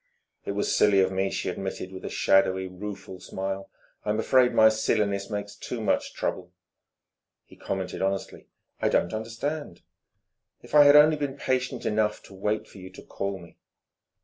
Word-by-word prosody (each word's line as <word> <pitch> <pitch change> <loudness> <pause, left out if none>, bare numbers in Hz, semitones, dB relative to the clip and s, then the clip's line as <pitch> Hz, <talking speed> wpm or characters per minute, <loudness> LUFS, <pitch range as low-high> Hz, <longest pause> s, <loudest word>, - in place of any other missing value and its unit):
"It - - -2
was 105 - 0
silly 100 -2 +4
of 95 0 +3
me," 95 +1 0
she - - -3
admitted 95 0 -4
with 95 - -9
a - - -4
shadowy, 95 -1 +2
rueful 95 0 -8
smile. 95 +1 -5 0.3
"I'm 105 +1 -1
afraid 125 +2 +4
my 110 - +6
silliness 100 -2 0
makes 105 -1 -4
too 120 - -6
much 110 - -1
trouble...." 90 -1 -3 0.9
He - - -17
commented 95 -2 -4
honestly: 95 0 -3 0.3
"I - - +2
don't 85 - +1
understand." 115 - -4 0.8
"If - - -15
I 145 -1 +8
had 145 0 +8
only 150 +1 +7
been 140 -2 -3
patient 130 -2 -2
enough 105 0 0
to - - -14
wait 105 +3 -2
for 100 - -14
you 95 0 -9
to 95 - -13
call 100 0 -4
me...." 85 -2 -15
100 Hz, 170 wpm, -26 LUFS, 95-110 Hz, 0.9 s, I